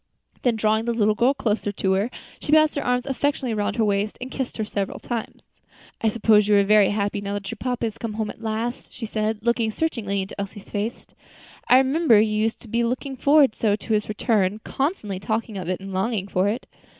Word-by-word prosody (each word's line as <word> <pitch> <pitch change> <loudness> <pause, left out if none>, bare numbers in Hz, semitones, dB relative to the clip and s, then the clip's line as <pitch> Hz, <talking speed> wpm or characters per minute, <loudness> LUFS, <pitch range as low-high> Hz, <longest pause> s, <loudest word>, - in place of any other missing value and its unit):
Then, 245 -3 +2
drawing 220 +1 +1
the 235 -1 0
little 215 -2 +3
girl 245 +6 +2
closer 215 -5 -1
to 190 -1 -1
her, 195 +4 +1 0.3
she - - -4
passed 310 0 +5
her 285 - -2
arm 250 0 +1
affectionately 270 -2 -1
around 210 -1 -1
her 225 -2 +2
waist, 205 +1 0
and 255 +1 -7
kissed 265 -2 -4
her 220 - -1
several 200 -2 -3
times. 235 -2 -5 0.6
"I 225 - +3
suppose 210 -1 +4
you 210 - +4
are 200 - +5
very 210 0 +5
happy 205 0 -1
now 200 0 -3
that 200 +1 -5
your 230 - -7
papa 245 -2 -1
has 225 0 -5
come 230 -2 -4
home 215 0 -2
at - - -16
last?" 225 +2 -3
she 235 - -6
said, 215 0 -1
looking 235 -1 +2
searchingly 215 -8 -1
into 195 +1 -6
Elsie's 200 0 -8
face. 210 +3 -3 0.6
"I 250 - +7
remember 265 -3 +4
you 215 0 +2
used 220 +1 0
to - - -13
be 235 +2 0
looking 255 +3 -2
forward 280 -1 +5
so 210 -2 +1
to 220 +2 -4
his 210 0 0
return; 210 -2 +1
constantly 265 - -2
talking 220 +2 -2
of 185 -3 -4
it 185 - -1
and 195 0 -8
longing 195 +1 -1
for 185 0 +1
it." 225 +5 -2
220 Hz, 220 wpm, -23 LUFS, 205-240 Hz, 0.6 s, I